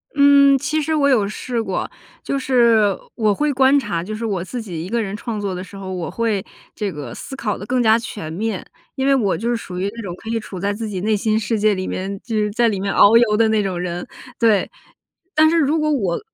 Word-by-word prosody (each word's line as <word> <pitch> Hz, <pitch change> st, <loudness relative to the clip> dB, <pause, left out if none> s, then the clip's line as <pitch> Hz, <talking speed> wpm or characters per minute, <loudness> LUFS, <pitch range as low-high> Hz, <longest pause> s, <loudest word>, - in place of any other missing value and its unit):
嗯， 280 Hz, -1 st, +6 dB
其 310 Hz, +4 st, -1 dB
实 315 Hz, +1 st, -1 dB
我 280 Hz, -2 st, +3 dB
有 215 Hz, -7 st, +3 dB
试 235 Hz, +2 st, -3 dB
过。 -, -, -3 dB, 0.3 s
就 275 Hz, -, -2 dB
是 230 Hz, -7 st, +3 dB, 0.2 s
我 215 Hz, -3 st, +2 dB
会 295 Hz, +6 st, 0 dB
观 265 Hz, +2 st, +4 dB
察， 200 Hz, -9 st, -3 dB
就 215 Hz, +3 st, -5 dB
是 230 Hz, +1 st, -4 dB
我 190 Hz, -5 st, -2 dB
自 245 Hz, +5 st, -5 dB
己 170 Hz, -6 st, -6 dB
一 185 Hz, -, -7 dB
个 235 Hz, 0 st, 0 dB
人 200 Hz, -1 st, -4 dB
创 215 Hz, 0 st, -4 dB
作 200 Hz, -2 st, -2 dB
的 180 Hz, -, -5 dB
时 195 Hz, -, -13 dB
候， 190 Hz, -1 st, -6 dB
我 175 Hz, -3 st, -4 dB
会 220 Hz, -4 st, -1 dB, 0.3 s
这 205 Hz, -3 st, -2 dB
个 140 Hz, -7 st, -7 dB
思 270 Hz, -, -8 dB
考 215 Hz, -7 st, -2 dB
得 205 Hz, -, -8 dB
更 250 Hz, +1 st, 0 dB
加 220 Hz, 0 st, +5 dB
全 205 Hz, -8 st, -7 dB
面。 205 Hz, +2 st, -3 dB, 0.3 s
因 265 Hz, 0 st, -1 dB
为 275 Hz, -, +4 dB
我 210 Hz, -8 st, +1 dB
就 230 Hz, -, -3 dB
是 240 Hz, -, +1 dB
属 180 Hz, -5 st, -7 dB
于 195 Hz, -, -1 dB
那 230 Hz, -, -6 dB
种， 180 Hz, -4 st, -6 dB
可 225 Hz, -, -10 dB
以 230 Hz, 0 st, 0 dB
处 190 Hz, -4 st, -8 dB
在 200 Hz, +2 st, -1 dB
自 220 Hz, +1 st, -5 dB
己 190 Hz, -3 st, -4 dB
内 215 Hz, +1 st, +1 dB
心 215 Hz, +1 st, +1 dB
世 220 Hz, 0 st, -1 dB
界 210 Hz, 0 st, +3 dB
里 185 Hz, -, -4 dB
面， 195 Hz, +1 st, -4 dB
就 230 Hz, -3 st, -4 dB
是 210 Hz, -1 st, +1 dB
在 235 Hz, +2 st, +2 dB
里 200 Hz, -4 st, -1 dB
面 195 Hz, 0 st, -2 dB
遨 210 Hz, +3 st, +6 dB
游 215 Hz, -3 st, +3 dB
的 225 Hz, -1 st, +4 dB
那 215 Hz, -1 st, +2 dB
种 185 Hz, -3 st, -3 dB
人， 175 Hz, 0 st, -4 dB, 0.3 s
对。 220 Hz, -5 st, +3 dB, 0.7 s
但 315 Hz, +1 st, +6 dB
是 335 Hz, -, +2 dB
如 310 Hz, +1 st, +2 dB
果 305 Hz, 0 st, +1 dB
我 195 Hz, -11 st, 0 dB
215 Hz, 275 characters per minute, -20 LUFS, 195-240 Hz, 0.7 s, 嗯